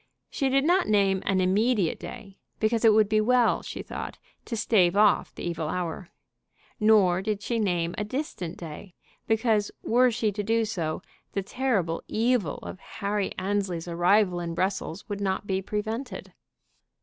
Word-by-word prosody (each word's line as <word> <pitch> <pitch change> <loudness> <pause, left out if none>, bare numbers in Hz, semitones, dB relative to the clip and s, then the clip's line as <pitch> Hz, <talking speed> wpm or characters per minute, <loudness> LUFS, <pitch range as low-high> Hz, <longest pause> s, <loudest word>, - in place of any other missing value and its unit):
She 275 -2 0
did 275 +1 +3
not 360 +3 +3
name 195 -3 +3
an 190 -1 +2
immediate 200 0 +2
day, 200 -5 -10 0.2
because 225 +1 +1
it 225 - +7
would 215 -1 +4
be 215 +1 +2
well, 245 +2 +3
she - - -7
thought, - - -6 0.3
to 230 - -4
stave 195 -4 +3
off 210 0 +3
the - - -7
evil 165 -3 -3
hour. 175 +1 -4 0.7
Nor 205 -5 +4
did 205 0 -2
she 235 -1 -1
name 175 -5 0
a - - 0
distant 210 - -4
day, 170 +2 -9 0.3
because, 220 -2 +2
were 250 +2 +4
she 225 -2 0
to 205 +1 -3
do 225 +2 +1
so, 170 -8 -3 0.3
the 195 - -1
terrible 200 -8 -1
evil 225 - +1
of - - -7
Harry 200 -1 -3
Annesley's 190 -3 -2
arrival 180 +2 +3
in 170 -1 -4
Brussels 190 0 -2
would 205 -1 -4
not 195 0 -1
be 190 -1 -1
prevented. 220 +6 -4
205 Hz, 160 wpm, -27 LUFS, 185-225 Hz, 0.7 s, it